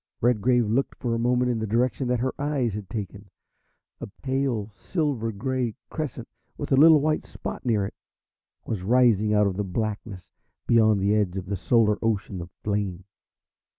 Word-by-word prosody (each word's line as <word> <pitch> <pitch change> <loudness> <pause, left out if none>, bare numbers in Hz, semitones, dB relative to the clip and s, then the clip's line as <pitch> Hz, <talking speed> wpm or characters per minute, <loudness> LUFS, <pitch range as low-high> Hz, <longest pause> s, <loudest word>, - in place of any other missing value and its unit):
Redgrave 120 +1 +3
looked 120 +6 0
for 120 -2 -2
a 115 - -1
moment 125 +1 +2
in 115 - -1
the 110 - -2
direction 125 +4 0
that 125 -1 0
her 130 +1 -1
eyes 140 -6 0
had 105 -2 -6
taken. 100 -2 -6 0.7
A - - -6 0.2
pale, 130 -6 -1
silver 135 - -2
grey 125 +1 -2 0.2
crescent, 135 -7 -4 0.3
with 145 - -5
a - - +6
little 155 +2 +7
white 155 +2 0
spot - - -7
near 110 -5 +1
it, 100 - -6 0.7
was 105 -5 -3
rising 110 -1 +3
out 105 0 +4
of 95 -2 -1
the 105 - 0
blackness 100 -1 -4 0.3
beyond 110 -3 +4
the 100 +2 +2
edge 100 -3 +1
of 95 - -4
the 100 +2 -3
solar 105 +2 +2
ocean 100 -4 -1
of 85 - -8
flame. 100 -3 -2
115 Hz, 175 wpm, -25 LUFS, 100-125 Hz, 0.7 s, little